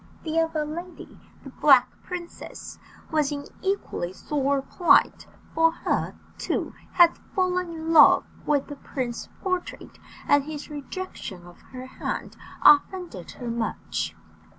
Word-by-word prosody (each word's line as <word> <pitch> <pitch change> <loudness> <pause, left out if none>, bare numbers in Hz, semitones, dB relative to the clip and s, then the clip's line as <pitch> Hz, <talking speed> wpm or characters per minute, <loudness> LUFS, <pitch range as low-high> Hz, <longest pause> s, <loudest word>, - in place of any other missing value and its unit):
The 320 0 0
other 320 -2 0
lady 340 +4 -8 0.2
the 270 - -10
Black 260 -3 +6
Princess 350 -1 -8 0.3
was 305 -2 +1
in 285 -1 -4 0.2
equally 385 - -2
sore 280 +4 -1
plight, 345 +4 +3 0.3
for 325 0 +3
she, - - -1 0.3
too, - - -2 0.2
had 345 -2 +6 0.2
fallen 365 -2 +1
in 325 0 -3
love 305 - +8 0.2
with 290 -2 +2
the 290 - -9
prince's 250 -4 -5
portrait, 365 -2 -4 0.3
and 285 -1 +4
his 300 -1 -7
rejection 290 - -7
of 175 0 -15
her 255 0 -10
hand 260 - -5 0.3
offended 295 - +4
her 240 -1 -5
much. 230 -1 -3
300 Hz, 130 wpm, -25 LUFS, 270-345 Hz, 0.3 s, love